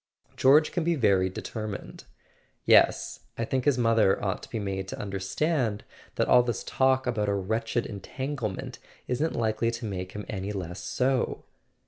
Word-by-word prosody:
" - - -46
George 145 +4 +5
can 175 - -1
be 170 +1 +2
very 100 -8 +3
determined." 105 +2 -6 0.3
" - - -34 0.3
Yes. - - +4 0.2
I 115 - -1
think 130 +2 -1
his 145 -3 +3
mother 115 -4 +3
ought 95 +1 -1
to - - -11
be 115 - -3
made 95 -2 -3
to - - -5
under¬ 100 -2 -5
stand 120 - 0 0.3
that - - +1
all 125 - +7
this 120 -1 -2
talk 130 0 +2
about 110 -5 0
a 100 - +1
wretched 110 +4 -1
entanglement 115 +1 -5 0.3
isn't 145 +6 -1
likely 110 0 +1
to 115 0 -4
make 95 -3 -5
him 105 0 -6
any 100 -1 -4
less 90 -2 -5
so." 130 0 0
115 Hz, 175 wpm, -27 LUFS, 100-130 Hz, 0.3 s, all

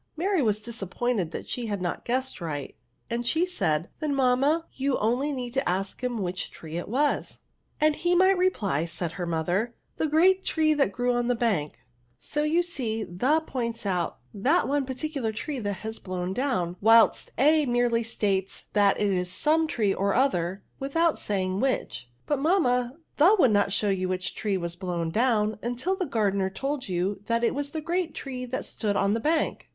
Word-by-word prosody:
Mary 370 +1 +1
was 215 -4 +1
disappointed 220 -2 -2
that - - -7
she 240 -2 -3
had 205 -2 -2
not 175 -1 -3
guessed 255 -4 -2
right, 145 -4 -4 0.3
and 235 +1 -2
she 325 +7 +2
said, 160 - 0
'^ - - -18
Then, 300 -2 -1
mamma, 275 +5 +2
you 275 +1 -1
need - - +2
only 250 +2 -1
ask 190 +7 -2
him 240 -5 -1
which 180 0 -3
tree 160 0 -9
it 175 - -4
was»" 285 +6 0 0.2
'' - - -43
And 305 -1 +3
he 350 +2 +1
might 375 +2 +5
reply," 210 - +1
said 170 0 -4
her 175 0 -4
mother, 175 +8 -1 0.2
the 315 - +1
great 370 +5 +4
tree 310 -1 +2
that 280 -9 +2
grew 245 +3 0
on 240 0 0
the 245 - +2
bank! 205 -11 0 0.4
So 295 - -3
you 315 +4 +2
see 240 -10 -2
the 255 - +1
points 235 -5 -3
out 180 -3 -1 0.2
that 255 - +2
one 280 -1 0
particular 265 -3 -2
tree 255 +5 -4
has 210 +2 -4
been - - -28
blown 185 0 -3
down; 190 -8 -1
whilst 225 +2 +5
a 300 +2 +4
merely 240 -1 +2
states 200 -4 -2
that 205 -2 +3
it 205 -1 +2
is 180 -1 0
some 315 - +2
tree 210 -9 +1
or 200 +1 0
other, 195 -8 +1 0.2
without 325 +4 +1
saying 190 -2 -1
which." 255 - -1
*^ - - -36
But, 290 -2 0
mamma, 255 -7 +2 0.2
the 355 +9 +6
would 260 - +5
not 200 -1 +2
show 205 +1 +1
you 185 -1 0
which 185 -1 -2
tree 205 -3 -1
was 170 -1 -3
blown 175 -3 -3
down 215 -1 +1
until 245 +11 -1
the 370 -3 -2
gar* 220 -6 +1
dener 190 -1 -1
told 270 +2 -3
you 185 +2 -1
that 230 0 +1
it 235 - +2
was 285 0 -3
the 315 +1 -4
great 340 +1 -2
tree 255 -2 -5
that 255 +1 -4
stood 205 -3 -2
on 200 +1 +2
the 225 - 0
bank." 310 +6 0
235 Hz, 200 wpm, -27 LUFS, 195-285 Hz, 0.4 s, the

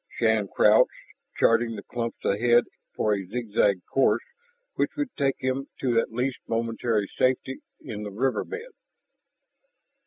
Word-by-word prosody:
Shann 110 -3 +2
crouched, - - +5 0.5
charting 115 0 +3
the 100 - -7
clumps 115 -1 -5
ahead 120 +4 +4 0.3
for 105 - +1
a 100 -1 -2
zigzag 100 -3 0
course 135 - +2 0.5
which - - -1
would 290 -4 -3
take 135 -2 +1
him 130 +2 -2
to 120 -3 +3
at - - -2
least 125 +3 -2
momentary 115 -2 0
safety 130 +1 +1 0.2
in 105 -1 -6
the 105 - -5
river 125 +6 0
bed. 455 +3 -7
115 Hz, 135 wpm, -26 LUFS, 105-130 Hz, 0.5 s, crouched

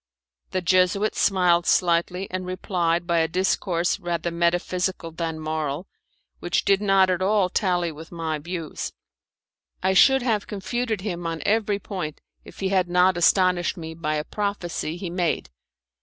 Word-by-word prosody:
The 185 - -1
Jesuit 185 +3 +3
smiled 180 -3 +3
slightly 180 +2 +2
and 185 0 -3
replied 175 -2 -1
by 170 -1 +2
a 160 - +2
discourse 180 0 0
rather 170 -1 -2
metaphysical 175 +1 -1
than 165 -1 -4
moral, 155 +1 -3 0.5
which 175 - -1
did 195 0 +3
not 195 -2 +4
at 180 0 -1
all 195 -1 +2
tally 175 -3 0
with 160 +1 -11
my 160 -2 -3
views. 165 0 -5 0.9
I 190 +1 +3
should 265 +6 +6
have 220 -5 0
confuted 220 +1 -2
him 175 -4 -4
on 165 -1 -4
every 210 -1 +2
point 185 -7 -5 0.2
if - - -13
he 190 - 0
had 185 -2 +1
not 180 +1 +4
astonished 180 0 +3
me 160 -1 -6
by 155 -2 -2
a 150 - -1
prophecy 175 -5 -3
he 180 -1 -5
made. 175 - -1
180 Hz, 155 wpm, -24 LUFS, 170-190 Hz, 0.9 s, should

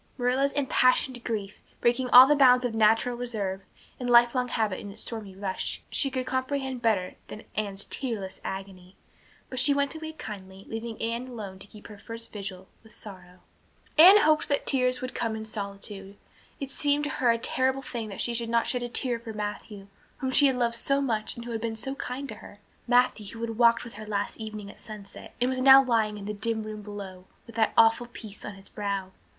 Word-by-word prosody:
Marilla's 260 +2 +1
impassioned 255 -2 +2
grief, 210 -3 -4 0.2
breaking 245 +1 +1
all 250 +1 +11
the 295 +2 +4
bounds 250 -3 +6
of 240 - -1
natural 225 +2 +3
reserve 210 -6 -3 0.4
and 250 -1 -3
lifelong 240 +1 +5
habit 220 -5 -1
in 205 - -8
its 200 - -4
stormy 210 -5 -6
rush, 195 -1 -3
she 275 - +1
could 260 -1 -3
comprehend 260 0 -2
better 200 -6 0
than 215 - -9
Anne's 200 -2 -3
tearless 220 -8 -4
agony. 190 -1 -7 0.6
But 255 - -2
she 285 +3 +4
went 280 0 0
away 315 0 -7
kindly, 195 -8 -9
leaving 225 0 -6
Anne 235 +2 -2
alone 205 -6 -8
to 195 - -10
keep 210 0 -15
her 210 -1 -11
first 230 +2 -8
vigil 190 -2 -7
with 220 -1 -16
sorrow. 185 -3 -12 0.5
Anne 380 +6 +9
hoped 310 0 +3
that 285 - +1
the - - +2
tears 255 -2 +1
would 255 0 -5
come 225 -2 -2
in 220 0 -6
solitude. 200 -1 -6 0.4
It 275 -1 -5
seemed 290 +1 +1
to 295 - -2
her 245 - +4
a 230 - +4
terrible 260 +3 0
thing 230 -4 -5
that 195 - -4
she 235 - -1
could 230 0 -2
not 230 0 +2
shed 250 - -1
a 240 - -4
tear 240 -1 0
for 230 -1 -8
Matthew, 205 -1 -6 0.3
whom 260 -1 -2
she 285 +2 +5
had 265 - +1
loved 235 -1 0
so 275 +3 +1
much 225 -6 -1
and 235 -1 -8
who 240 - -6
had 225 -1 -3
been 225 -1 -2
so 240 +5 -4
kind 275 0 -5
to 215 - -5
her, 205 - -13 0.3
Matthew 245 -3 +3
who 230 - -8
had 230 -1 -4
walked 235 -1 +5
with 230 -4 -10
her 215 0 -8
last 205 +1 -2
evening 215 -2 -7
at - - -16
sunset 210 -2 -10
and 245 - +2
was 255 0 -1
now 270 +1 +9
lying 220 -4 +1
in 200 - -8
the 210 - -3
dim 220 +1 -2
room 215 0 -7
below 200 -3 -8 0.2
with 230 - -13
that 220 -1 +2
awful 225 +1 +5
peace 220 -4 -10
on 205 - -7
his 195 0 -13
brow. 200 -2 -3
230 Hz, 215 wpm, -27 LUFS, 205-255 Hz, 0.6 s, all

